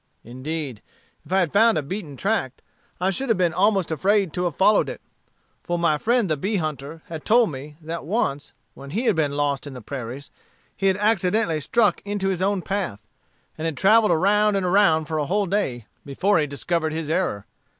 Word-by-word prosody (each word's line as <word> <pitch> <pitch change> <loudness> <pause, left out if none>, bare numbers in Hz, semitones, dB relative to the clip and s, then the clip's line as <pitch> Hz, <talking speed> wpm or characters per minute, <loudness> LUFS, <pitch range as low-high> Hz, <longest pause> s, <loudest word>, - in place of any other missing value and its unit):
Indeed, 130 0 -5 0.4
if - - -16
I 190 0 +4
had 170 -5 -1
found 225 +2 +5
a 155 - -1
beaten 150 -3 -6
tract, 195 - -1 0.4
I 185 +2 +1
should 265 +7 -2
have 225 - +3
been 175 -3 +1
almost 195 -1 +2
afraid 195 +2 +1
to 180 - -1
have 170 -5 -2
followed 210 +2 +4
it; - - -7 0.6
for 175 - -2
my 165 -3 +1
friend 235 +1 +2
the 155 - +1
bee 195 +9 -2
hunter 155 -2 -4
had 160 -2 -7
told 230 -3 +4
me, 145 +2 -8
that 165 +2 -5
once, 155 - -2 0.2
when 140 - -11
he 210 - -2
had 225 -5 +3
been 145 -3 0
lost 145 -1 -1
in 135 - -8
the - - -7
prairies, 130 +3 -7 0.4
he 195 - 0
had 190 -1 +2
accidentally 205 -4 +1
struck 210 +2 +2
into 200 -1 -2
his 185 -2 -2
own 195 -1 0
path, 180 - -3 0.5
and 160 - -3
had 160 -4 -2
travelled 215 +2 +5
around 210 +4 +3
and 195 -2 0
around 180 -4 +3
for 155 0 -2
a 145 - -1
whole 205 +3 +1
day 170 - -2 0.2
before 175 +7 +1
he 150 - 0
discovered 160 +3 -2
his 160 -1 -3
error. 165 - -1
175 Hz, 200 wpm, -23 LUFS, 150-200 Hz, 0.6 s, found